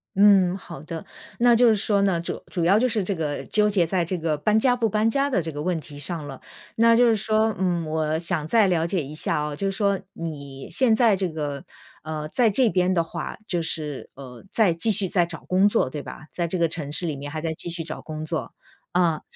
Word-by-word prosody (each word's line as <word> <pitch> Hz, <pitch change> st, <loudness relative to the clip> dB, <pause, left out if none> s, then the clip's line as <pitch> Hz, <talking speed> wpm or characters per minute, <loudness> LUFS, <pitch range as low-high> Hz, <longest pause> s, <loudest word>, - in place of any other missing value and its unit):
嗯， 195 Hz, -2 st, +5 dB
好 170 Hz, -6 st, -10 dB
的， 160 Hz, +1 st, -7 dB, 0.3 s
那 240 Hz, 0 st, +5 dB
就 245 Hz, +1 st, +5 dB
是 225 Hz, -, +5 dB
说 205 Hz, -1 st, +1 dB
呢， 195 Hz, -4 st, +2 dB
主 170 Hz, -, -5 dB
主 175 Hz, -4 st, -3 dB
要 195 Hz, +4 st, +5 dB
就 255 Hz, -, +3 dB
是 215 Hz, -3 st, 0 dB
这 200 Hz, -, -1 dB
个 155 Hz, -4 st, -3 dB
纠 210 Hz, -1 st, +2 dB
结 195 Hz, -4 st, +2 dB
在 175 Hz, +1 st, 0 dB
这 180 Hz, +2 st, -2 dB
个 160 Hz, -2 st, -1 dB
搬 210 Hz, +8 st, +2 dB
家 245 Hz, +1 st, +3 dB
不 230 Hz, -3 st, 0 dB
搬 215 Hz, +2 st, +1 dB
家 275 Hz, +4 st, +1 dB
的 250 Hz, -, +1 dB
这 165 Hz, 0 st, -5 dB
个 145 Hz, 0 st, -5 dB
问 175 Hz, 0 st, -1 dB
题 145 Hz, -2 st, -11 dB
上 160 Hz, 0 st, -2 dB
了。 135 Hz, -2 st, -9 dB, 0.4 s
那 230 Hz, 0 st, +5 dB
就 245 Hz, +1 st, +5 dB
是 225 Hz, -, +4 dB
说， 215 Hz, +1 st, +1 dB
嗯， 175 Hz, -3 st, 0 dB
我 155 Hz, 0 st, -1 dB
想 170 Hz, -2 st, -2 dB
再 220 Hz, +2 st, +4 dB
了 170 Hz, -2 st, +1 dB
解 175 Hz, -4 st, -1 dB
一 140 Hz, -, -8 dB
下 155 Hz, -, 0 dB
啊， 150 Hz, -1 st, -3 dB
就 195 Hz, +5 st, -1 dB
是 195 Hz, -, -4 dB
说 200 Hz, -2 st, +1 dB
你 140 Hz, -5 st, -7 dB
现 245 Hz, -4 st, +4 dB
在 220 Hz, -3 st, +4 dB
这 190 Hz, -1 st, -1 dB
个， 145 Hz, -3 st, -4 dB, 0.4 s
呃， 155 Hz, 0 st, -4 dB
在 235 Hz, +5 st, +3 dB
这 240 Hz, +3 st, +3 dB
边 180 Hz, -2 st, +1 dB
的 170 Hz, -3 st, +2 dB
话， 165 Hz, -, -6 dB
就 175 Hz, -4 st, -1 dB
是， 150 Hz, -4 st, -4 dB
呃， 130 Hz, -3 st, -11 dB
在 210 Hz, -7 st, +3 dB
继 165 Hz, +7 st, +2 dB
续 200 Hz, -2 st, +2 dB
在 175 Hz, -2 st, +1 dB
找 165 Hz, -, -9 dB
工 190 Hz, +3 st, +4 dB
作， 205 Hz, -, +1 dB
对 150 Hz, -, -5 dB
吧？ 155 Hz, -, -10 dB
在 170 Hz, -1 st, -1 dB
这 185 Hz, -, -2 dB
个 170 Hz, -1 st, +2 dB
城 155 Hz, -3 st, -6 dB
市 175 Hz, +4 st, +1 dB
里 155 Hz, -3 st, -2 dB
面 145 Hz, +1 st, -7 dB
还 155 Hz, -, -4 dB
在 160 Hz, 0 st, -2 dB
继 165 Hz, -, -6 dB
续 170 Hz, -1 st, -3 dB
找 155 Hz, 0 st, -7 dB
工 155 Hz, 0 st, -6 dB
作， 160 Hz, 0 st, -4 dB, 0.4 s
呃， 170 Hz, -3 st, +2 dB
175 Hz, 265 characters per minute, -24 LUFS, 155-205 Hz, 0.4 s, 嗯